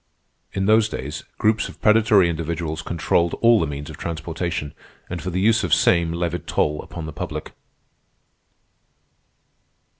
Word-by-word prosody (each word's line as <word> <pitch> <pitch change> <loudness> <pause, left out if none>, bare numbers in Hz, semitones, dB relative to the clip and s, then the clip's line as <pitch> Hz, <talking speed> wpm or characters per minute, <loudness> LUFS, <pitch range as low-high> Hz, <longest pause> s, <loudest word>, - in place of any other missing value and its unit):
'" - - -41
In 95 - +1
those 110 +1 +4
days, 75 -3 -6
groups 110 0 +1
of - - -13
predatory 105 -4 +5
individuals 85 -1 -3
controlled 85 0 0
all 115 -1 +5
the 80 - 0
means 70 0 -6
of - - -9
transportation, 80 -2 -4 0.4
and 90 - -4
for 95 - -4
the 90 +1 -2
use 110 +4 +3
of 85 -2 +3
same 85 0 +3
levied 85 0 -3
toll 75 0 0
upon 85 -2 -8
the 80 - -7
public. - - -5
85 Hz, 150 wpm, -22 LUFS, 80-95 Hz, 0.4 s, predatory